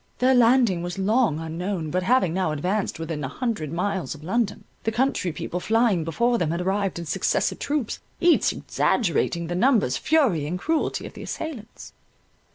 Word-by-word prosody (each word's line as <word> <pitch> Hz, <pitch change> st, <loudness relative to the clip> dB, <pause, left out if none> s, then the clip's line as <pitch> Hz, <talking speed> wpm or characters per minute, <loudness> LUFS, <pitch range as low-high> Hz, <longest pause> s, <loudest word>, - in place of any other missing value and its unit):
Their 255 Hz, +1 st, +4 dB
landing 235 Hz, -6 st, +4 dB
was 175 Hz, +2 st, -5 dB
long 205 Hz, -, +2 dB
unknown, 165 Hz, 0 st, -3 dB
but 185 Hz, -, 0 dB
having 185 Hz, -4 st, +2 dB
now 185 Hz, -3 st, 0 dB
advanced 185 Hz, +7 st, -1 dB
within 160 Hz, -2 st, -4 dB
an 135 Hz, -, -3 dB
hundred 210 Hz, -, -3 dB
miles 185 Hz, 0 st, -2 dB
of 150 Hz, -, -13 dB
London, 210 Hz, +4 st, -1 dB, 0.2 s
the 225 Hz, -, 0 dB
country 235 Hz, -6 st, 0 dB
people 175 Hz, +3 st, -4 dB
flying 220 Hz, -4 st, +2 dB
before 235 Hz, +9 st, +1 dB
them 160 Hz, -2 st, 0 dB
arrived 190 Hz, +3 st, -1 dB
in 170 Hz, -, -5 dB
successive -, -, 0 dB
troops, 285 Hz, -6 st, -2 dB, 0.2 s
each 345 Hz, -1 st, +4 dB
exaggerating 170 Hz, -4 st, 0 dB
the 175 Hz, -, -4 dB
numbers, 195 Hz, -, +2 dB
fury, 240 Hz, -, +2 dB
and 175 Hz, +4 st, -2 dB
cruelty 320 Hz, -, -1 dB
of -, -, -9 dB
the -, -, -10 dB
assailants. 250 Hz, -9 st, -7 dB
190 Hz, 165 wpm, -24 LUFS, 165-240 Hz, 0.2 s, Their